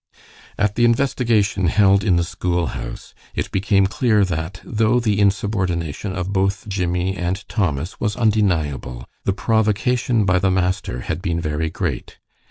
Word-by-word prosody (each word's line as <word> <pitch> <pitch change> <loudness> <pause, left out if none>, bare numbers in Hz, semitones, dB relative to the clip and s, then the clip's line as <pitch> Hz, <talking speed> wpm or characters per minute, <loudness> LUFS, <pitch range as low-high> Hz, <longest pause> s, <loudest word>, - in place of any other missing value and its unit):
At 100 0 +1
the 120 - +1
investigation 115 -6 +2
held 100 +2 +4
in 95 -4 +3
the 85 - +2
school 85 0 -1
house, - - -7 0.2
it - - -3
became 95 0 +2
clear 110 -1 +2
that, 90 +1 -4
though 115 +2 +1
the 105 -4 0
insubordination 95 -4 0
of 95 +1 -3
both 95 +2 0
Jimmie 90 -1 -1
and 95 +2 -3
Thomas 85 -5 -2
was 105 -3 -1
undeniable, 80 - 0 0.2
the 95 - +2
provocation 110 +2 +1
by 90 -1 +3
the 95 +1 +2
master 95 -8 -1
had 80 +6 -4
been 85 -3 -1
very 75 0 -2
great. - - -4
95 Hz, 150 wpm, -21 LUFS, 85-105 Hz, 0.2 s, held